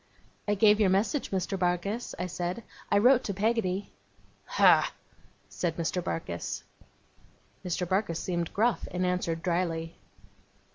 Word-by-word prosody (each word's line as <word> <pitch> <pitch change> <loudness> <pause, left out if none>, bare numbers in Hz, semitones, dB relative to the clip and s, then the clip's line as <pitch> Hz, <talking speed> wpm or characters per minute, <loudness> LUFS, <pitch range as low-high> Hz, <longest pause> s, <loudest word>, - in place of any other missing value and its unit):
'I 205 - +2
gave 210 +1 +5
your 205 -3 +4
message, 210 +10 +1
Mr. 190 0 -2
Barkis,' 185 +6 -1
I 180 - -2
said: 180 +4 -4 0.3
'I - - +5
wrote 250 +4 +5
to 200 - -3
Peggotty.' 205 -2 0 0.7
'Ah!' - - +6 0.6
said 170 -3 -3
Mr. 170 +1 -1
Barkis. 85 - -4 1.0
Mr. 180 -1 -2
Barkis 185 -3 0
seemed 175 -2 -2
gruff, 230 +3 +1
and 180 0 -1
answered 175 -2 -1
drily. 170 -2 -1
185 Hz, 130 wpm, -29 LUFS, 175-205 Hz, 1.0 s, Ah